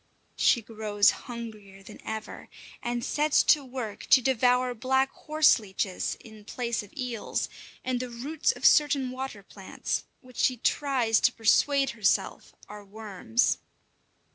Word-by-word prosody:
She 235 - +3
grows 210 -1 +2
hungrier 215 -5 -9
than - - -13
ever, 220 0 -7 0.3
and 240 0 -3
sets 300 0 +2
to 295 - +4
work 245 -5 -6
to - - +7
devour 250 0 +2
black 265 +3 +1
horse 310 -3 +3
leeches 190 -2 -3
in 220 -2 -14
place 235 +1 -3
of 205 -1 -14
eels, 250 -4 -3 0.4
and 255 -1 -1
the 250 0 -4
roots 275 +7 -1
of - - -7
certain 280 -4 +4
water 255 -6 -6
plants, 195 0 -5 0.2
which 255 -1 -16
she 255 - +2
tries 245 -3 +1
to 245 - +3
persuade 270 +5 +2
herself 210 -4 -1
are 210 0 -10
worms. 215 +3 -1
240 Hz, 140 wpm, -27 LUFS, 215-260 Hz, 0.4 s, to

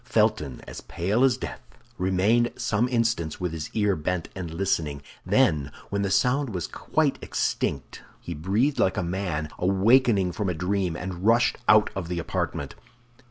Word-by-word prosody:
Felton, 110 - 0
as - - -8
pale 100 +9 0
as 130 -2 +4
death, - - -6 0.4
remained 100 +6 +2
some 115 +4 0
instants 115 -10 0
with 90 -2 -2
his 80 -2 -5
ear 105 -3 +2
bent 85 +2 -2
and 90 -4 -5
listening; 80 -5 -1 0.2
then, 70 -2 +2 0.2
when 100 0 0
the 100 - 0
sound 125 +3 +1
was 90 - -2
quite - - -1
extinct, 65 -3 -2 0.2
he 85 - -6
breathed 100 - 0
like 95 - +2
a - - 0
man 85 -4 -2
awaking 100 +1 +3
from 100 0 -2
a 90 - -2
dream, 90 0 -1
and 90 0 -6
rushed 115 +3 +3
out 110 -1 +5
of 95 -3 -4
the 90 0 -3
apartment. 85 - -3
95 Hz, 160 wpm, -26 LUFS, 85-110 Hz, 0.4 s, out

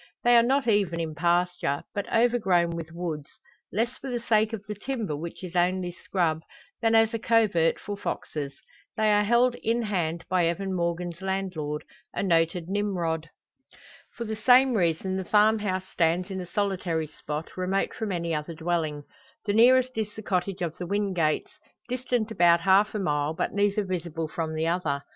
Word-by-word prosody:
They 240 0 +5
are 235 - +8
not 265 +2 +1
even 200 -6 +2
in 160 -2 -3
pasture, 175 -2 0
but 205 - -4
overgrown 210 -8 +3
with 165 -1 -6
woods; 165 -4 -4 0.4
less 235 +5 -1
for 270 - -6
the 245 -1 -2
sake 220 -1 +2
of 210 -3 -6
the 210 - -3
timber, 215 - -3
which 165 +5 -7
is 180 -1 -7
only 180 0 +1
scrub, 170 -3 -1 0.4
than 225 -1 +3
as 225 0 +4
a 230 - -1
covert 215 -8 +3
for 205 - -5
foxes. 150 -7 -4 0.4
They 215 -1 +3
are 205 0 +4
held 235 +3 +3
in 230 +1 0
hand 170 -5 -2
by 180 -2 +2
Evan 190 +3 -2
Morgan's 170 0 -2
landlord 185 -6 -3 0.3
a - - -1
noted 165 -1 +1
Nimrod. 175 -5 -1 0.9
For 235 - -3
the 220 0 -3
same 250 +4 +5
reason 185 -1 0
the 190 - -2
farm 215 +3 +4
house 185 -2 -2
stands 175 +3 +1
in 190 -1 -3
a 180 - -7
solitary 185 -5 -1
spot, 150 0 -6
remote 185 +1 -1
from 220 -3 -3
any 170 -2 -2
other 155 +2 -3
dwelling. 160 -3 -2 0.4
The 205 - 0
nearest 255 +3 +5
is 210 -1 -3
the 215 - -8
cottage 185 -1 -1
of 165 -1 -4
the 175 - -4
Wingates 185 -6 -1 0.3
distant 245 -3 -1
about 170 -4 +4
half 195 +4 +4
a - - 0
mile, 150 -3 0
but - - -2
neither 205 +1 +1
visible 170 -4 -3
from 160 0 -4
the 160 +1 0
other. 165 -5 -1
185 Hz, 180 wpm, -27 LUFS, 165-215 Hz, 0.9 s, are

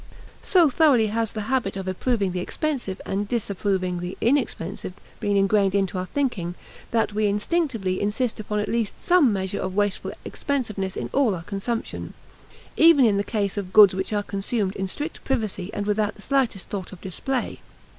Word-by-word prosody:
So 355 -4 +5
thoroughly 265 -6 +4
has 225 0 -1
the 215 - -4
habit 220 -3 -1
of 190 -1 -5
approving 200 +1 0
the 180 - -2
expensive 245 - -3
and 200 +1 -2
disapproving 195 -5 -1
the 180 +1 -5
inexpensive 215 - -1 0.3
been 205 -1 +1
ingrained 195 0 +3
into 195 -1 0
our 185 - -4
thinking 200 -12 -1 0.3
that 225 -2 +1
we 215 0 +2
instinctively 210 - 0
insist 215 +4 -1
upon 210 0 -3
at 210 - 0
least 230 -3 -1
some 350 -9 +4
measure 190 -2 -2
of 185 0 -3
wasteful 205 -1 0
expensiveness 215 -9 -2
in - - -4
all 260 -8 +3
our 170 - -7
consumption, 205 +5 -4 0.6
even 320 -5 +7
in 205 -3 +3
the 200 - +1
case 205 -2 -2
of 190 -2 -4
goods 205 -2 +9
which 190 +2 -3
are 205 -1 0
consumed 200 0 -2
in 190 0 -2
strict 295 - -6
privacy 215 -8 -2
and 205 - -3
without 210 0 0
the 210 - -11
slightest 265 -8 0
thought 195 -3 -5
of 190 - -10
display. 245 +9 -3
205 Hz, 175 wpm, -24 LUFS, 195-240 Hz, 0.6 s, goods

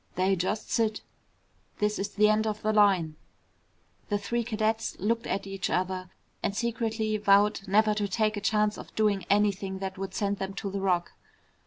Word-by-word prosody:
"They 190 +2 +2
just 190 +4 -2
sit. 220 -2 +1 0.8
This 210 0 0
is 195 +1 -2
the 210 +1 +3
end 215 +1 +2
of 215 0 -3
the 215 0 +1
line." 190 -7 +3 0.9
The 205 - +1
three 235 +4 -2
cadets 220 0 -1
looked 230 +4 0
at 200 - -2
each 195 0 -3
other 185 0 -1 0.3
and 200 - -2
secretly 225 -2 -1
vowed 205 0 +4
never 215 +2 +4
to 210 -1 -1
take 215 +2 0
a 205 - -4
chance 210 0 +1
of - - -11
doing 205 -4 +1
anything 200 -1 +1
that 190 0 -5
would 195 -1 -5
send 200 -1 0
them 195 0 -4
to 195 0 -4
the 195 0 -3
Rock. 180 -3 +1
205 Hz, 180 wpm, -28 LUFS, 195-215 Hz, 0.9 s, vowed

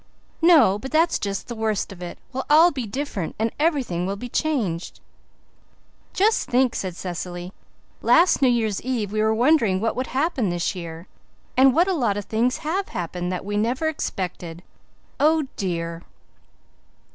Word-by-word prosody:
"No, 310 - +6
but 265 +5 -7
that's 325 +3 +2
just 200 -1 -3
the 240 - -5
worst 220 -3 -1
of 185 -2 -11
it. 175 -1 -7 0.2
We'll 265 - -4
all 320 +4 +7
be 255 -7 -4
different 215 - -4
and 225 +1 0
everything 260 - 0
will 195 - -2
be 245 +5 -7
changed." 230 - -2 1.1
"Just 430 +4 +1
think," 250 0 +3
said 185 -3 -4
Cecily, 175 0 -6 0.5
"last 345 -2 +4
New 265 - +5
Year's 225 -5 +1
Eve 235 -5 -2
we 215 0 0
were 220 0 +3
wondering 235 -6 +3
what 225 +3 -1
would 255 +1 -2
happen 265 - 0
this 175 +1 -1
year; 170 -2 -8 0.5
and 260 0 +5
what 345 +3 +4
a 385 - +1
lot 235 - 0
of 205 - -4
things 235 +3 0
have 380 +5 -1
happened 180 +1 -4
that 185 0 -4
we 205 0 -2
never 245 +9 0
expected. 180 - -4 0.6
Oh, 310 +2 +4
dear!" 170 -3 -3
220 Hz, 165 wpm, -23 LUFS, 185-280 Hz, 1.1 s, all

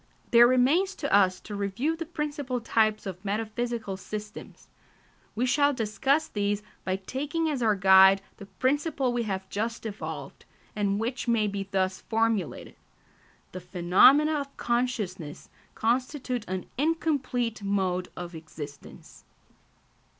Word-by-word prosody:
There 235 0 +8
remains 285 +11 +3
to 285 - -3
us 185 -2 +4
to 210 - -9
review 205 +10 -1
the 330 -1 -6
principal 290 -6 -3
types 215 -2 +1
of 185 -1 -6
metaphysical 220 0 -3
systems. 210 +2 -8 0.7
We 240 +4 +1
shall 285 +3 +3
discuss 265 +7 +1
these 205 0 -1 0.2
by 185 - -1
taking 285 - -3
as 275 -4 -2
our 220 -3 +3
guide 190 0 +6
the 200 - -11
principle 270 +1 0
we 240 - 0
have 190 -1 -3
just 230 +3 -3
evolved, 215 -1 -6 0.3
and 200 -1 0
which 240 +3 -3
may 230 -2 +2
be 200 -1 -3
thus 190 -1 -1
formulated: 225 -5 -1 0.8
_The 185 - -6
phenomena 195 - +4
of 280 0 -10
consciousness 215 -10 -2 0.3
constitute 250 0 -1
an 185 0 -3
incomplete 280 -8 0
mode 190 -2 -1
of 175 0 -6
existence. 155 -3 -10
220 Hz, 130 wpm, -27 LUFS, 195-260 Hz, 0.8 s, There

